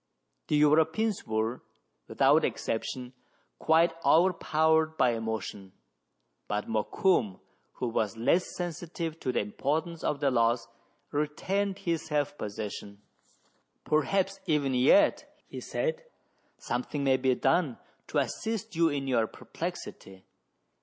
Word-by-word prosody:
The - - +1
Europeans 160 +8 +2
were, 110 +2 -1 0.5
without - - +4
exception, 125 +2 -3 0.5
quite 165 +1 +4
over 170 +6 +5
powered 160 0 +2
by 125 - +4
emotion; 110 -4 -4 0.7
but 105 0 -2
Mokoum, 110 - +1 0.3
who 125 - -3
was 110 -3 -1
less 165 +10 +1
sensitive 170 -2 -4
to 130 - -1
the - - +1
importance 155 +10 -2
of 145 - 0
the 140 -1 +2
loss, 115 -1 +2 0.4
retained 190 +7 -1
his 170 -5 -1
self 145 -1 -1
possession. 105 -1 -6 0.4
" - - -41
Perhaps 190 +6 +1
even 145 -4 +1
yet," 140 - +4
he - - -8
said, - - -2 0.3
" - - -41
something 150 - -3
may 135 -1 +4
be 130 -1 +2
done 140 -2 +1 0.3
to - - -2
assist 220 -6 -2
you 165 0 +4
in 140 -2 -2
your 115 -4 +2
perplexity. 95 -2 -7
145 Hz, 125 wpm, -29 LUFS, 115-170 Hz, 0.7 s, over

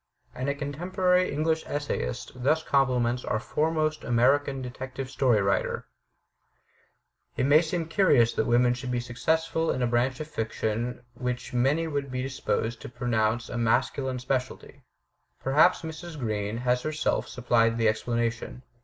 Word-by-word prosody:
And 130 +2 -3
a 140 - 0
contemporary 180 +6 +1
English 160 +2 0
essayist 145 -4 -3
thus 155 +5 +2
compliments 125 -4 +1
our 110 - -1
foremost 155 +4 0
American 135 +3 +2
detective 130 +1 -6
story 125 -7 +3
writer: 100 0 0 1.5
It - - +1
may 145 +3 +6
seem 170 0 -2
curious 150 - +4
that - - 0
women 120 +1 +4
should 125 +1 -6
be 125 -1 0
successful 160 +7 0
in 130 - 0
a - - +4
branch 120 +2 +1
of 155 - -5
fiction 115 -1 -3
which 125 0 -4
many 135 +7 +2
would 140 -3 -3
be 125 0 -3
disposed 120 -3 -2
to - - -7
pro 125 0 -5
nounce 115 +1 +1
a 120 - -4
masculine 130 +3 +1
specialty. 125 0 -3 0.6
Perhaps 155 +7 +4
Mrs. 160 0 -7
Green 110 -4 -2
has 125 0 +2
herself 155 +1 -1
supplied 115 -2 +2
the 115 -1 +2
explanation. 115 +2 -1
130 Hz, 145 wpm, -27 LUFS, 120-150 Hz, 1.5 s, may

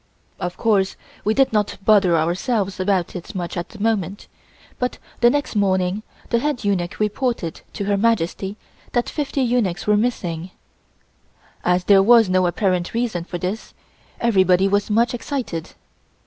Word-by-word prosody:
Of 180 0 -4
course 200 -4 +2 0.3
we 215 +1 +1
did 270 -4 +3
not 210 -1 0
bother 195 -6 +5
ourselves 190 +5 -1
about 185 -2 0
it 180 +3 -7
much 175 -2 -4
at 175 0 -4
the - - -12
moment, 205 -3 -1 0.5
but 250 0 -1 0.2
the 240 - +6
next 285 -2 -1
morning 190 -1 +1 0.3
the 235 - +3
head 290 -2 -2
eunuch 185 -4 -1
reported 215 -5 -1
to 200 - -4
Her 200 0 +1
Majesty 200 -2 0 0.4
that 240 -1 +1
fifty 285 -2 -1
eunuchs 230 -8 0
were 210 - +4
missing. 180 -7 -2 1.1
As 180 0 +2
there 195 0 +6
was 225 0 +6
no 185 -1 +3
apparent 180 +1 0
reason 225 -8 -1
for 175 - -5
this, 185 +5 -5 0.4
everybody 190 -4 +3
was 205 +2 +1
much 230 +4 +2
excited. 240 - -4
200 Hz, 150 wpm, -21 LUFS, 180-230 Hz, 1.1 s, the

